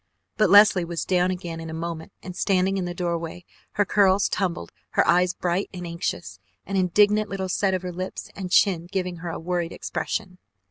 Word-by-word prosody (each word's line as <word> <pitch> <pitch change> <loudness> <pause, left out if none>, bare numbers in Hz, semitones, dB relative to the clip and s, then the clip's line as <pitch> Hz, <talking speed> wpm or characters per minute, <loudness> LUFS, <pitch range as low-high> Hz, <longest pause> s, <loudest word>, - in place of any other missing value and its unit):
But 215 -3 +3
Leslie 200 -2 +7
was 170 0 -4
down 180 -1 +2
again 175 -3 -4
in 165 0 -7
a 160 - -5
moment 165 +1 -5
and 180 -2 -7
standing 195 0 +1
in 180 - -2
the 175 - -4
doorway, 170 0 -3 0.3
her 205 - +2
curls 195 0 +3
tumbled, 175 - -2 0.3
her - - +4
eyes 180 +1 +3
bright 180 +2 -1
and 180 -1 -6
anxious, 100 - -4 0.3
an 195 - -4
indignant 205 +3 +3
little 190 -1 -3
set 190 +1 +1
of 185 - -4
lips 185 +1 -6
and 190 -2 -5
chin 180 -3 +3
giving 180 -3 -2
her 170 +1 -6
a - - -4
worried 175 0 -2
expression. 185 -4 -4
180 Hz, 190 wpm, -24 LUFS, 170-195 Hz, 0.3 s, Leslie